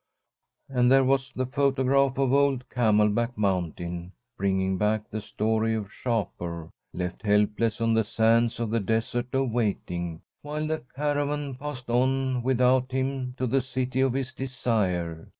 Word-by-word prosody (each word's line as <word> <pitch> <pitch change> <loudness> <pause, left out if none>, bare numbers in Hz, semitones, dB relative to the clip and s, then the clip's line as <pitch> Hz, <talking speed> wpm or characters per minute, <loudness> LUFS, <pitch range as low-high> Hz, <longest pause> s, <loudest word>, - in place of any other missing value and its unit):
And 125 -2 +2
there 135 0 +6
was 135 0 +1
the 130 +1 -2
photograph 135 0 +2
of 135 -1 +2
old 140 -2 +2
Camelback 110 0 +2
Mountain, 90 -2 -2 0.2
bringing 95 -2 0
back 105 0 +1
the 110 - -5
story 110 +2 0
of 105 -2 -4
Shapur, 85 -8 -3 0.2
left 90 +1 -4
helpless 105 +2 +1
on 115 0 +2
the 110 0 +3
sands 115 +2 +2
of 115 -2 -2
the 115 - +2
Desert 115 +4 -1
of 135 -2 +1
Waiting, 90 -7 -2 0.2
while 150 +1 -3
the 155 0 -2
caravan 145 0 -1
passed 130 -2 -6
on 130 +1 +1
without 130 +1 +2
him 130 -1 -2
to 130 - -1
the 135 +2 +2
City 130 0 -2
of 135 -2 +2
his 130 0 -3
Desire. 100 -11 -2
120 Hz, 150 wpm, -26 LUFS, 105-130 Hz, 0.2 s, there